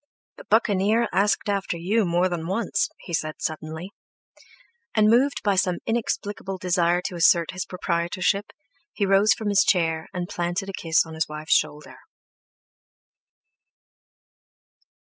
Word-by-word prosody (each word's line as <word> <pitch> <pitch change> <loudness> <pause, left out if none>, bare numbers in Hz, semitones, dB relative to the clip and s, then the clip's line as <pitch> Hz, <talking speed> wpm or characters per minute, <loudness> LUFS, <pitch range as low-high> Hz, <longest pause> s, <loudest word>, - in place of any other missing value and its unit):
"The - - -12
Buccaneer 220 +1 +2
asked 200 +3 +1
after 195 -3 -1
you 200 +6 +1
more 175 +1 +2
than 170 -2 -4
once," 195 +3 0
he 170 - -9
said 155 -1 -2
suddenly. 160 +4 -5 1.0
And 215 0 +4
moved 260 +4 +2
by 205 -2 +2
some 180 -1 +1
inexplicable 205 -4 -3
desire 175 -1 +1
to 195 - -4
assert 170 -1 +3
his 180 -1 -4
proprietorship, 180 +3 -1 0.5
he 205 - 0
rose 195 +2 +4
from 215 -2 -3
his 200 0 +4
chair 165 -3 +1
and 180 -1 -4
planted 175 +3 -3
a - - -6
kiss 165 -2 +1
on 160 - -10
his 160 0 -1
wife's 155 +1 -1
shoulder. 150 -1 -1
185 Hz, 135 wpm, -24 LUFS, 170-205 Hz, 1.0 s, And